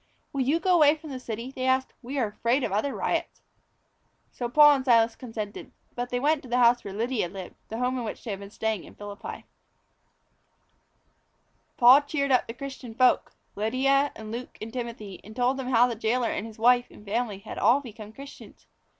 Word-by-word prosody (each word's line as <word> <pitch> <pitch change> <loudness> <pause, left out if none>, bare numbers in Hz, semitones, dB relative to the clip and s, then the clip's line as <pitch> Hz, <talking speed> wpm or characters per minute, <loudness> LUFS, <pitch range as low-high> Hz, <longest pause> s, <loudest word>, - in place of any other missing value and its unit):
"Will 275 - -1
you 285 +6 +2
go 365 +2 +2
away 305 -3 +6
from 310 -1 -10
the 260 - -5
city?" 235 +1 -6
they 260 -1 -4
asked. 260 0 +1
"We 265 +3 -6
are 255 - +2
afraid 235 +5 0
of 210 - -1
other 215 +8 -1
riots." - - -2 0.9
So 240 -1 -4
Paul 295 +3 +7
and 265 - -4
Silas 230 -3 +4
consented. 220 -4 -7 0.2
But 245 0 -4
they 245 - -1
went 295 +2 +2
to 255 - -13
the 245 - +1
house 240 0 +4
where 200 - -6
Lydia 220 -2 -1
lived 190 -1 -8 0.2
the 225 - -5
home 250 +1 0
in - - -3
which 215 - -6
they 225 - -4
had 195 - -4
been 200 0 -9
staying 220 -2 -2
in - - -14
Philippi. 205 0 -8 2.3
Paul 255 +3 +8
cheered 285 -1 -2
up 255 - +3
the 230 - -5
other - - -31
Christian 265 -4 -8
folk 255 +1 +3 0.2
Lydia 275 +6 +1
and 215 -1 -8
Luke 240 +2 -7
and 225 +1 -7
Timothy 230 -6 -6
and 215 +2 -12
told 250 +2 +1
them 265 -2 -4
how 245 -1 +5
the 245 - -1
jailor 230 +2 0
and 215 - -3
his 220 - -12
wife 245 +2 +4
and 210 - -16
family 215 0 -2
had 195 - -8
all 260 - +5
become 215 -5 -10
Christians. 275 +5 -13
245 Hz, 210 wpm, -27 LUFS, 220-265 Hz, 2.3 s, Paul